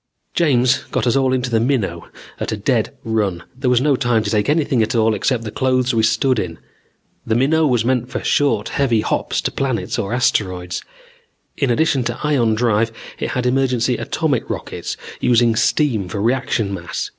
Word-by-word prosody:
"James 130 -5 +3
got - - -1
us 120 - +2
all 135 -1 +2
into 125 -1 -1
the 115 - +3
Minnow 110 - -1 0.3
at - - -3
a - - -2
dead - - 0
run. 105 -6 -1
There 130 0 -1
was 125 -1 +3
no 145 0 +3
time 120 -4 +1
to 100 - -2
take 105 +2 +1
anything 145 -5 +2
at 110 +3 0
all 110 -1 +3
except 120 +1 0
the 110 - -5
clothes 130 0 +1
we 115 - +2
stood 115 +3 +2
in. 80 -4 -4 0.7
The 110 - 0
Minnow 155 +6 +3
was 120 -4 +1
meant 125 -1 0
for - - -4
short 115 -8 +1
heavy 120 -6 +1
hops - - -1
to - - -2
planets 130 -3 -2
or 100 -2 -3
asteroids. 90 -7 0 0.7
In 140 - 0
addition 135 +1 +2
to 120 - -1
the - - -5
ion 120 -7 +2
drive 115 -1 +1 0.3
it - - -2
had 125 - -1
emergency 125 -1 +1
atomic - - -1
rockets, - - -5 0.2
using 120 -1 +3
steam 110 - +1
for 100 - -4
reaction 115 -3 0
mass. 85 -2 -4
120 Hz, 190 wpm, -19 LUFS, 110-130 Hz, 0.7 s, James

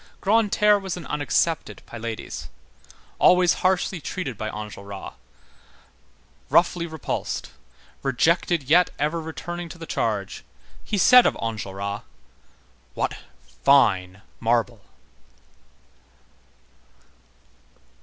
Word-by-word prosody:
Grantaire 210 0 +3
was 190 -2 -4
an 175 - -8
unaccepted 150 +2 -1
Pylades. 115 -1 -6 0.7
Always 180 -1 +5
harshly 185 -1 +1
treated 145 -10 -4
by 110 +1 -4
Enjolras, 100 -2 -8 1.4
roughly 170 0 +3
repulsed, 160 -3 -4 0.5
rejected 165 +4 +1
yet 170 +7 +4
ever 155 +3 -1
returning 175 +2 -6
to 170 - -10
the 165 - -8
charge, 105 -9 -2 0.4
he 210 - -2
said 250 +5 +7
of - - -1
Enjolras: 100 -2 -4 0.9
"What - - -1 0.5
fine 100 -8 +3 0.2
marble!" 115 -1 0
150 Hz, 85 wpm, -24 LUFS, 110-175 Hz, 1.4 s, said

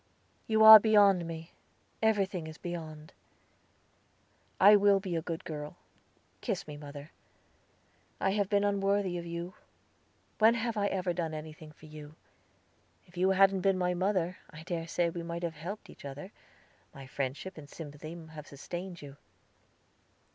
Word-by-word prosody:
"You 220 -1 +3
are 220 0 +13
beyond 200 -5 +4
me; 165 0 -8 0.5
everything 195 -6 0
is 160 0 -9
beyond." 160 -3 -7 1.5
"I 205 +2 +8
will 200 -1 +4
be 185 -3 -4
a 165 - -1
good 165 0 -5
girl. 150 -2 -6 0.7
Kiss 195 -5 -3
me, 150 - -7
mother. 145 +1 -10 1.1
I 195 - +1
have 200 -1 0
been 205 -1 +2
unworthy 200 -2 0
of 170 - -8
you. 170 +2 -5 0.9
When 225 +2 +6
have 230 0 -2
I 205 -1 +1
ever 185 -2 -1
done 165 -2 -3
anything 155 0 -9
for 150 - -18
you? 155 0 -11 0.9
If 175 - -21
you 185 +2 +2
hadn't 195 0 +4
been 195 0 +2
my 180 -1 0
mother, 185 -1 -1
I 155 +1 -11
dare 165 -1 -4
say 170 0 0
we 170 - -5
might 170 +1 -6
have 170 -1 -2
helped 185 +7 -7
each - - -15
other, 145 +7 -8 0.6
my 135 -1 -10
friendship 140 +8 -5
and 145 -2 -12
sympathy 155 +1 -9 0.2
have 150 -1 -10
sustained 175 +4 -8
you. 140 -1 -11
175 Hz, 155 wpm, -30 LUFS, 155-195 Hz, 1.5 s, are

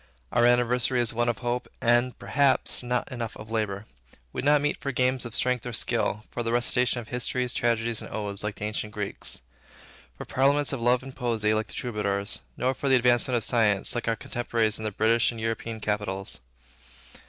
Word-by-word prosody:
Our 120 0 +4
anniversary 120 +1 +3
is 120 -1 0
one 120 +1 +1
of 120 - -1
hope, 120 +1 -1
and, 120 +2 +2
perhaps, 140 -3 +3
not 125 0 -2
enough 120 -3 -5
of 105 +1 -10
labor. 105 -2 -2 0.5
We - - -2
do 140 - -2
not 150 0 +6
meet 145 0 0
for 140 - -2
games 130 -1 +2
of 115 - -5
strength 125 -1 +2
or 120 - -5
skill, 115 -2 0
for 120 - -3
the 115 -1 -1
recitation 120 +1 +2
of 115 - -9
histories, 125 0 -1
tragedies, 115 -1 0
and - - -9
odes, 105 -2 -4
like 105 0 -3
the 105 - -5
ancient 105 0 -3
Greeks; 105 -1 -5 0.8
for - - -7
parliaments 140 +2 +2
of 130 - -3
love 125 +2 +3
and 135 0 -9
poesy, 115 -4 0
like 110 0 0
the - - -12
Troubadours; 100 -4 -2 0.2
nor 130 +1 +1
for 140 +1 -2
the 135 - +6
advancement 125 0 +3
of 115 - +1
science, 110 -3 +2
like 120 -1 -3
our 115 - +2
contemporaries 115 -2 -1
in 110 - -5
the - - +1
British 110 +3 +3
and 115 - -5
European 115 0 -3
capitals. 105 -2 -2
120 Hz, 200 wpm, -27 LUFS, 110-125 Hz, 0.8 s, not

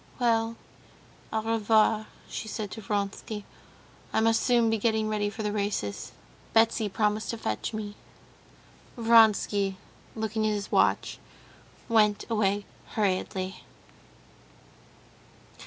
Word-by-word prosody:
"Well, 230 -2 +1 0.8
au 220 -1 -1
revoir," 220 -1 +2 0.2
she 220 - -5
said 215 -2 -4
to 220 - -7
Vronsky. 205 +1 -3 0.7
"I - - +2
must 225 0 +3
soon 235 -3 +3
be 225 - +1
getting 220 0 +1
ready 210 -1 0
for 215 +1 -6
the 210 - -1
races. 200 - -2 0.4
Betsy 225 -1 +3
promised 210 +2 0
to 230 - -2
fetch 110 - -3
me." 210 -2 -5 1.0
Vronsky, 220 -4 +4 0.4
looking 220 0 -1
at 215 - +1
his 205 -1 -5
watch, - - +2 0.7
went 210 -3 +3
away 205 -2 +1 0.3
hurriedly. 190 -2 -1
215 Hz, 110 wpm, -28 LUFS, 205-225 Hz, 1.0 s, Vronsky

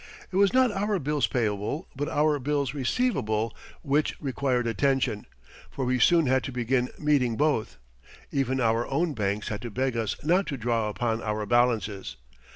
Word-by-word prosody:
It - - -6
was 200 0 +4
not 255 -2 +4
our 205 +1 0
bills 150 -2 0
payable 110 +4 -2
but 145 +2 -2
our 150 0 +2
bills 140 -1 -1
receivable 120 - 0 0.3
which 145 0 0
required 130 -3 -1
attention, 130 -2 0 0.4
for 135 - -3
we 125 0 +1
soon 165 +6 +5
had 130 0 +2
to - - -4
begin 125 0 0
meeting 135 -7 +1
both. 145 - 0 0.5
Even 130 -1 0
our 115 -1 +1
own 160 +4 0
banks 105 -2 -2
had 105 -2 -4
to 120 - -5
beg 130 +3 -1
us 115 -3 -1
not 180 +6 +2
to 140 - -3
draw 115 -2 0
upon 115 +3 -1
our 105 -1 -2
balances. 105 - +1
130 Hz, 165 wpm, -27 LUFS, 115-150 Hz, 0.5 s, soon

